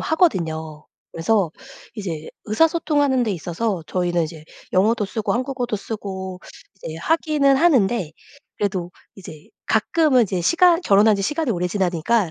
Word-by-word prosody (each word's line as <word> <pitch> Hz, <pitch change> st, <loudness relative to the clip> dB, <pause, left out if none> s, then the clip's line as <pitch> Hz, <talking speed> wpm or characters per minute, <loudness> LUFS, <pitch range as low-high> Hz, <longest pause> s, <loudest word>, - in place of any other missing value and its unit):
하거든요. 160 Hz, -, 0 dB, 0.3 s
그래서 185 Hz, +1 st, +1 dB, 0.4 s
이제 170 Hz, -8 st, -5 dB, 0.2 s
의사소통하는 290 Hz, +1 st, +2 dB
데 225 Hz, -, -1 dB
있어서 180 Hz, +1 st, -3 dB
저희는 175 Hz, -2 st, 0 dB
이제 155 Hz, -1 st, -9 dB, 0.3 s
영어도 210 Hz, +3 st, +2 dB
쓰고 215 Hz, +2 st, -2 dB
한국어도 250 Hz, -2 st, -2 dB
쓰고 190 Hz, -3 st, -6 dB, 0.4 s
이제 160 Hz, -4 st, -8 dB
하기는 295 Hz, -, +2 dB
하는데 240 Hz, -, +2 dB, 0.5 s
그래도 185 Hz, -4 st, -2 dB, 0.2 s
이제 160 Hz, -6 st, -12 dB, 0.2 s
가끔은 260 Hz, +3 st, +3 dB
이제 185 Hz, -2 st, -2 dB
시간 340 Hz, -, +4 dB
결혼한 210 Hz, -3 st, +5 dB
지 195 Hz, -, -3 dB
시간이 295 Hz, +6 st, -1 dB
오래 180 Hz, -3 st, -1 dB
지나니까 185 Hz, +1 st, 0 dB
205 Hz, 330 characters per minute, -21 LUFS, 175-260 Hz, 0.5 s, 결혼한